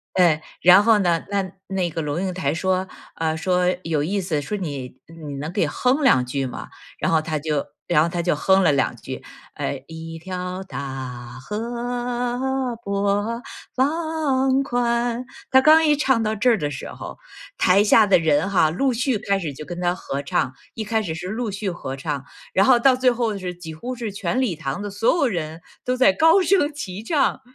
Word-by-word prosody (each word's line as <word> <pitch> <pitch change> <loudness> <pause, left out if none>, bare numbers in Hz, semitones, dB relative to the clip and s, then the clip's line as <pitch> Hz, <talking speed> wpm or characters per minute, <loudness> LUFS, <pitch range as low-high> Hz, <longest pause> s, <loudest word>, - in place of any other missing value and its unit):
嗯， 170 -4 +4 0.2
然 185 +3 +8
后 225 -1 +5
呢， 175 -4 +1
那 195 -2 -1 0.2
那 190 -2 -1
个 165 0 -3
龙 150 +2 -2
应 185 -1 -2
台 160 -6 -1
说， 185 +3 0 0.3
啊， 160 -1 -1
说 180 +2 +1
有 160 -4 0
意 200 +5 -1
思。 160 -5 -1
说 210 +8 -3
你 140 -8 -6
你 155 -4 -8
能 150 +3 -4
给 200 +4 +1
哼 260 +4 +1
两 130 - +4
句 135 +2 -2
吗？ 130 - -6 0.3
然 - - 0
后 160 -1 +3
他 155 -1 -2
就 150 -1 -1 0.2
然 155 -3 +4
后 170 - 0
他 175 - -2
就 170 -2 +1
哼 190 +5 +3
了 160 - +4
2 140 -2 +1
句， - - -8 0.3
呃， 70 - -3
一 165 0 -8
条 180 +2 -5
大 130 -6 -6
河 245 - -2
波 200 +3 0 0.3
浪 275 -2 +1
宽。 240 -1 0 0.3
他 265 0 +6
刚 315 +3 +7
一 300 -1 +4
唱 265 -5 +2
到 215 0 0
这 250 +4 +3
儿 225 - +3
的 145 -4 -2
时 135 - -6
候， - - -8 0.4
台 190 - +4
下 210 +1 +5
的 195 - +5
人 160 +2 +2
哈， 180 -5 +4
陆 255 - +1
续 250 0 0
开 200 -1 0
始 160 -7 -4
就 155 - -8
跟 175 +2 -6
他 175 0 +1
合 140 -5 -4
唱。 135 -2 0 0.2
一 220 - -4
开 220 +1 0
始 165 -6 -4
是 175 +3 -6
陆 220 +2 -2
续 200 0 -3
合 135 -6 -6
唱， 140 0 -3 0.3
然 195 +2 +4
后 255 -2 +6
到 260 +2 +5
最 255 0 +3
后 230 -4 -1
是， 180 -2 -5
几 170 -2 -9
乎 245 +11 -5
是 230 -4 -4
全 200 +4 -2
礼 225 -9 0
堂 150 +2 -4
的 205 - -4
所 205 +10 +2
有 295 -5 +2
人， 165 -6 -3 0.2
都 250 0 +1
在 250 -6 +5
高 325 - +5
声 360 -4 +3
齐 200 -8 -6
唱 285 +5 +1
190 Hz, 215 characters per minute, -22 LUFS, 160-240 Hz, 0.4 s, 然